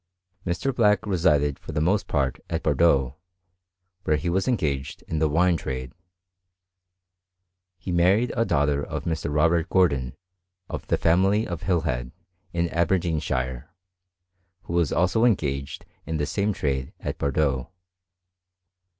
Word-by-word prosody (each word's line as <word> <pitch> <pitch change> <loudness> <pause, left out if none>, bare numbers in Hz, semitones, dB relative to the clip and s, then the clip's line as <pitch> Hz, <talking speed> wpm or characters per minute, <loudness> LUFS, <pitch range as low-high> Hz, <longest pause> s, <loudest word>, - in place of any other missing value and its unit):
Mr. 120 +10 -1
Black 105 -3 +3
resided 75 -7 +2
for - - -9
the - - 0
most 95 +6 +1
part 65 -4 0
at - - -2
Bordeaux, 70 -6 +2 0.9
where 75 - +2
he 80 +4 -1
was 95 +5 0
engaged 70 - -1
in 80 - -3
the 80 -1 +2
wine 85 +3 +3
trade. 65 -3 -5 1.8
He 90 +1 -6
married 95 +8 +3
a 115 - +2
daughter 75 -6 +1
of - - -5
Mr. 80 -3 -2
Robert 80 +2 +2
Gordon, 70 -9 +2 0.5
of - - -6
the - - +2
family 95 +6 +3
of 85 -3 -5
Hilhead, 75 -10 -1 0.4
in 85 0 0
Aber 85 +3 +2
deenshire, 70 -7 -2 1.0
who - - -7
was 85 -4 +2
also 95 +6 +2
engaged 70 - 0 0.2
in 80 0 -2
the 75 - 0
same 100 +9 0
trade 70 -8 -2
at - - -5
Bordeaux. 70 -2 0
80 Hz, 135 wpm, -25 LUFS, 70-90 Hz, 1.8 s, Black